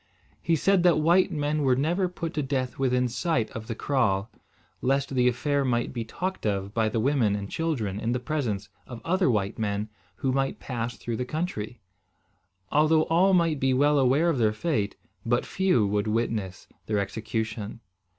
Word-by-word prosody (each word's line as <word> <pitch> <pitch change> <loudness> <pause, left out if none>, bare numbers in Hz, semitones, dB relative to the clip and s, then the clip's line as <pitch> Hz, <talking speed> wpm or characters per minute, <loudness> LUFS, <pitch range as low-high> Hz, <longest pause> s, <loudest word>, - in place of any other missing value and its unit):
He 165 - +2
said 195 +4 +3
that 175 -3 +4
white 170 +5 +4
men 150 -1 -1
were 130 -3 +3
never 175 +7 +1
put 170 -2 -5
to 150 - -1
death 135 -2 -2
within 125 -1 +2
sight 125 -1 -1
of 110 -3 -7
the 115 - -3
kraal, 110 -6 0 0.5
lest 135 +1 0
the 125 -1 +3
affair 140 +3 +1
might 120 -2 0
be 120 -2 -3
talked 185 +11 -4
of 100 -1 -1
by 110 -2 +1
the 115 - -1
women 120 -4 +2
and 100 -1 -5
children 120 -12 -2
in 115 +2 -1
the 125 - 0
presence 120 -8 -2 0.2
of 120 -2 -8
other 185 -1 +2
white 105 -1 0
men 105 0 -1 0.3
who 135 -2 -1
might 135 +1 0
pass 120 -2 -4
through 115 -2 -4
the 125 - -1
country. 125 - -4 0.9
Although 155 +1 +4
all 185 +3 +5
might 165 -4 +2
be 130 -1 +2
well 145 +2 +4
aware 135 +6 +3
of 150 -6 0
their 110 -2 +3
fate, 110 -4 -1 0.3
but 120 +1 +1
few 185 - +2
would 105 +1 0
witness 110 -4 -2 0.2
their 105 - 0
execution. 110 +1 -3
125 Hz, 180 wpm, -26 LUFS, 110-155 Hz, 0.9 s, all